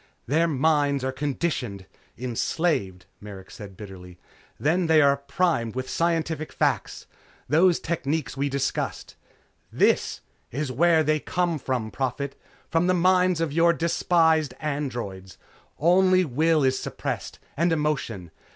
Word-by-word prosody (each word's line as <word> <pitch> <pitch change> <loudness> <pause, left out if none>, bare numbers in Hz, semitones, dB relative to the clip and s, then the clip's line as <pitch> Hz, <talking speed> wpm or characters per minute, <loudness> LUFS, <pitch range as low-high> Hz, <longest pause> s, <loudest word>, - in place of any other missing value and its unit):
"Their 160 +6 +2
minds 145 -2 +1
are 130 - -1
conditioned 130 - -3 0.3
enslaved," 120 - -1
Merrick 100 -2 -11
said 100 -4 -10
bitterly. 90 -4 -11 0.4
"Then 170 +4 +1
they 160 -1 +5
are 140 -1 +5
primed 140 - -1
with 130 0 -3
scientific 165 -2 -1
facts. - - -1 0.4
Those 170 +5 +4
techniques 155 -5 -2
we 140 +1 -1
discussed. 135 0 -3 0.6
This - - +1 0.3
is 140 +1 -3
where 160 +4 +3
they 155 +1 +1
come 175 -1 -1
from, 125 -5 -3
Prophet. 135 +1 -3 0.3
From 165 +2 +1
the 185 - +3
minds 180 0 +3
of 160 -3 -1
your 170 +1 +4
despised 160 -3 +2
androids. 120 - -4 0.4
Only 185 +3 +4
will 155 +3 +2
is 130 0 +2
suppressed, - - -5 0.2
and 170 +4 +1
emotion. 135 - -2
150 Hz, 125 wpm, -25 LUFS, 125-165 Hz, 0.6 s, they